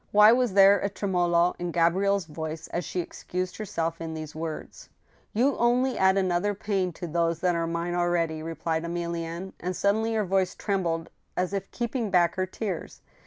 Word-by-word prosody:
Why 210 +1 +8
was 245 -3 +2
there 195 0 +7
a 200 - -1
tremolo 175 -3 +1
in 175 0 -2
Gabrielle's 185 +3 +2
voice 160 +1 -6
as 175 - -2
she 180 +4 -2
excused 180 +1 -5
herself 165 -6 -3
in 160 -1 -4
these 155 -1 -6
words? 160 0 -6 0.2
" - - -35
You 260 +5 +3
only 250 +2 +2
add 190 0 +4
another 190 +2 +1
pain 195 -3 -1
to 175 - -6
those 170 0 0
that 180 -1 +2
are 165 -1 -1
mine 170 +1 -2
already," 175 -2 0
re 165 +1 -5
plied 160 +1 -1
Emilienne, 170 +1 -4
and 180 +1 -3
suddenly 220 +4 +1
her 215 -2 +1
voice 190 0 +1
trembled 170 -5 -1 0.3
as 180 +2 0
if 195 -1 -3
keeping 235 -2 -2
back 175 -2 +3
her 185 -1 -1
tears. 190 -2 -5
180 Hz, 185 wpm, -27 LUFS, 170-200 Hz, 0.3 s, Why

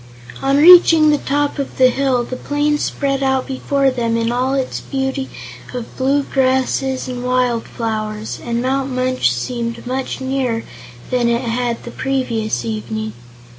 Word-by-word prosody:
On 275 +1 +2
reaching 325 -1 +8
the 295 - +2
top 290 +1 -1
of 275 - -4
the 255 -1 +6
hill, 260 -1 +1
the 255 - -5
plain 295 +2 0
spread 275 -2 -1
out 265 -1 +1
before 275 0 0
them 230 -2 -1
in 230 0 0
all 255 +2 0
its 265 -2 -2
beauty 265 0 -3 0.5
of 245 -2 -6
blue 275 +2 +1
grasses 265 0 0
and 250 -1 -5
wildflowers, 225 -3 -2
and 235 0 -2
Mount 270 +1 0
Munch 255 - +1
seemed 235 - -4
much 260 +1 -3
nearer 260 -3 -1 0.5
than 245 -2 +2
it 235 +1 +1
had 240 0 -2
the 240 - -8
previous 230 - -2
evening. 110 -1 -4
255 Hz, 150 wpm, -18 LUFS, 235-270 Hz, 0.5 s, reaching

